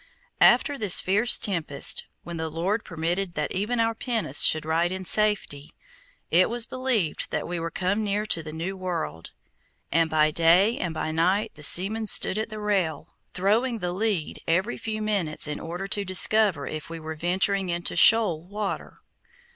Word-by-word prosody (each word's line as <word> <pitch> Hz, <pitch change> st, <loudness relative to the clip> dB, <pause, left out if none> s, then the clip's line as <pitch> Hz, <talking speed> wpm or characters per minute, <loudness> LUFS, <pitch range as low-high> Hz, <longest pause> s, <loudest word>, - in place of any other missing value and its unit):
After 285 Hz, -2 st, +3 dB
this 205 Hz, -5 st, +5 dB
fierce 205 Hz, +6 st, +5 dB
tempest, 165 Hz, -8 st, +2 dB, 0.2 s
when 170 Hz, -1 st, -8 dB
the 160 Hz, 0 st, -4 dB
Lord 185 Hz, +8 st, -3 dB
permitted 175 Hz, +2 st, -4 dB
that 150 Hz, -, -3 dB
even 210 Hz, +6 st, -2 dB
our 225 Hz, 0 st, +1 dB
pinnace 225 Hz, -, -1 dB
should 155 Hz, -1 st, +6 dB
ride 165 Hz, +2 st, 0 dB
in 190 Hz, 0 st, -6 dB
safety, 205 Hz, -8 st, +1 dB, 0.6 s
it 180 Hz, +2 st, +3 dB
was 235 Hz, 0 st, 0 dB
believed 250 Hz, -10 st, -2 dB
that -, -, -4 dB
we 175 Hz, 0 st, -4 dB
were 165 Hz, 0 st, -4 dB
come 190 Hz, +5 st, -2 dB
near 205 Hz, +1 st, -2 dB
to 170 Hz, -6 st, -1 dB
the 155 Hz, -1 st, -9 dB
new 170 Hz, +5 st, -5 dB
world, 170 Hz, -, -6 dB, 0.6 s
and 165 Hz, +1 st, +1 dB
by 155 Hz, -1 st, +2 dB
day 175 Hz, +8 st, +3 dB
and 170 Hz, -3 st, -4 dB
by 155 Hz, 0 st, -3 dB
night 180 Hz, +6 st, 0 dB
the 150 Hz, -, -15 dB
seamen 205 Hz, +8 st, +1 dB
stood 205 Hz, +1 st, +3 dB
at 220 Hz, -, -4 dB
the 215 Hz, -1 st, -8 dB
rail, 190 Hz, -7 st, -3 dB, 0.2 s
throwing 225 Hz, +6 st, 0 dB
the 180 Hz, -4 st, -4 dB
lead 200 Hz, -5 st, -3 dB
every 185 Hz, +8 st, 0 dB
few 215 Hz, -1 st, -5 dB
minutes 190 Hz, -9 st, -1 dB
in 150 Hz, -, -5 dB
order 175 Hz, +4 st, -7 dB
to 205 Hz, +1 st, -1 dB
discover 185 Hz, -3 st, +3 dB
if 155 Hz, 0 st, -7 dB
we 165 Hz, 0 st, -7 dB
were 160 Hz, 0 st, -7 dB
venturing 185 Hz, +4 st, -1 dB
into 170 Hz, 0 st, -3 dB
shoal 210 Hz, -8 st, +5 dB
water. 205 Hz, +1 st, -6 dB
185 Hz, 175 wpm, -24 LUFS, 165-210 Hz, 0.6 s, should